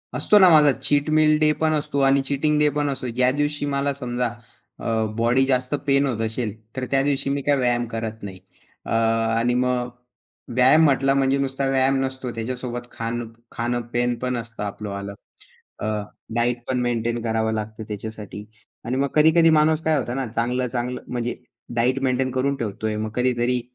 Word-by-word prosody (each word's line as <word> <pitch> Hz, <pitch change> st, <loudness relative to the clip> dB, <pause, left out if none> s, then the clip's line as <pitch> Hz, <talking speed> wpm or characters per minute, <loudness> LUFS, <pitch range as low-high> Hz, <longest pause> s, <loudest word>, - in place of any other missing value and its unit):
असतो 210 Hz, -, +4 dB
ना 185 Hz, -, +8 dB
माझा 150 Hz, -3 st, +7 dB
चीट 145 Hz, +2 st, 0 dB
मील 155 Hz, 0 st, +4 dB
डे 155 Hz, 0 st, +4 dB
पण 160 Hz, 0 st, +2 dB
असतो 145 Hz, -2 st, -1 dB
आणि 135 Hz, 0 st, +4 dB
चीटिंग 150 Hz, +2 st, 0 dB
डे 150 Hz, -, +4 dB
पण 145 Hz, 0 st, -1 dB
असतो. 130 Hz, -2 st, -4 dB
ज्या 125 Hz, +2 st, +2 dB
दिवशी 145 Hz, +1 st, -1 dB
मला 140 Hz, 0 st, 0 dB
समजा 125 Hz, -2 st, -2 dB, 0.5 s
अ, -, -, -9 dB, 0.3 s
बॉडी 120 Hz, +3 st, +3 dB
जास्त 130 Hz, +1 st, 0 dB
पेन 140 Hz, 0 st, +3 dB
होत 120 Hz, -5 st, -2 dB
असेल, 110 Hz, -1 st, -2 dB, 0.2 s
तर 130 Hz, -1 st, -3 dB
त्या 135 Hz, 0 st, +3 dB
दिवशी 140 Hz, -1 st, 0 dB
मी 140 Hz, 0 st, -1 dB
काय 145 Hz, +1 st, +2 dB
व्यायाम 120 Hz, -2 st, +1 dB
करत 110 Hz, -1 st, -5 dB
नाही. 95 Hz, -2 st, -7 dB, 0.5 s
अ, -, -, -6 dB, 0.5 s
आणि 120 Hz, +1 st, +1 dB
मग 125 Hz, 0 st, 0 dB, 0.7 s
व्यायाम 130 Hz, +5 st, +6 dB
म्हटला 135 Hz, -1 st, +3 dB
म्हणजे 135 Hz, 0 st, +2 dB
नुसता 135 Hz, 0 st, -1 dB
व्यायाम 135 Hz, 0 st, +2 dB
नसतो. 130 Hz, -2 st, -4 dB
त्याच्यासोबत 120 Hz, +1 st, -5 dB
खाणं 115 Hz, +1 st, -4 dB, 0.2 s
खाणं 120 Hz, +1 st, -2 dB
पेन 120 Hz, +1 st, 0 dB
असतं 115 Hz, -2 st, -6 dB
आपलं 105 Hz, +1 st, -5 dB
आलं. 100 Hz, 0 st, -5 dB, 0.7 s
अ, -, -, -4 dB, 0.5 s
डायट 120 Hz, 0 st, 0 dB
पण 130 Hz, -1 st, 0 dB
मेंटेन 120 Hz, -1 st, -1 dB
करावं 110 Hz, -1 st, 0 dB
लागतं 110 Hz, 0 st, -5 dB
त्याच्यासाठी 105 Hz, 0 st, -7 dB, 0.4 s
आणि 125 Hz, +3 st, -1 dB
मग 140 Hz, +1 st, +1 dB
कधी-कधी 160 Hz, +2 st, +5 dB
माणूस 155 Hz, 0 st, +3 dB
काय 160 Hz, -1 st, +2 dB
होता 120 Hz, -3 st, -2 dB
ना, 135 Hz, -1 st, -2 dB
चांगलं-चांगलं 125 Hz, +2 st, -2 dB
म्हणजे 120 Hz, -1 st, -3 dB, 0.4 s
डायट 125 Hz, +3 st, +2 dB
मेंटेन 130 Hz, 0 st, +1 dB
करून 135 Hz, +2 st, 0 dB
ठेवतोय. 110 Hz, -2 st, -3 dB
मग 110 Hz, 0 st, -3 dB
कधीतरी 125 Hz, 0 st, +1 dB
125 Hz, 175 wpm, -23 LUFS, 120-140 Hz, 0.7 s, ना